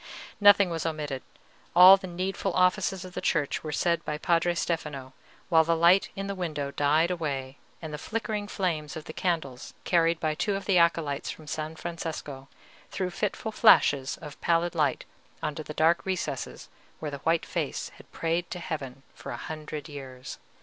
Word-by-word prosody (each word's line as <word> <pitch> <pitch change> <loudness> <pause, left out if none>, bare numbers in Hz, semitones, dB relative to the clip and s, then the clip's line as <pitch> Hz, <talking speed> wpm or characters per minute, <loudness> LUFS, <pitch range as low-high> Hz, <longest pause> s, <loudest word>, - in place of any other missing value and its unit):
Nothing 205 -2 +6
was 165 -2 -2
omitted; 150 -4 -3 0.5
all 180 +2 +11
the 195 -1 -7
needful 185 +1 -2
offices 185 +1 +2
of 180 - -10
the - - -4
Church 150 -4 0
were 155 - -4
said 170 +3 +1
by 150 - -3
Padre 170 +2 +1
Stefano, 150 -6 -3 0.4
while 165 -2 +6
the 165 +1 +1
light 170 +4 +5
in 195 - -4
the 200 - -3
window 155 -7 -3
died 150 +5 +2
away, 140 -6 -3 0.2
and 155 -1 -6
the 150 - -5
flickering 215 0 -3
flames 165 -8 -2
of 155 - -7
the 155 - -8
candles 160 -9 -3
carried 165 -1 +2
by 155 -1 0
two 200 +6 -1
of 195 -1 -5
the 185 -3 +4
acolytes 165 -4 +1
from 155 - -8
San 155 +2 -4
Francesco 160 -5 -6 0.4
threw 185 -2 -3
fitful 210 +3 -3
flashes 140 -9 +4
of 150 -2 -10
pallid 170 +1 +1
light 150 -6 0 0.4
into 150 0 -2
the 150 - -8
dark 160 +3 +3
recess 185 -2 -4 0.3
where 150 -2 -5
the 140 - -6
white 165 +3 +1
face - - -3
had - - -17
prayed 165 +2 -1
to - - -5
Heaven 135 -6 -6
for - - -10
a - - -4
hundred 155 -1 -6
years. 130 -4 -9
165 Hz, 175 wpm, -27 LUFS, 150-180 Hz, 0.5 s, all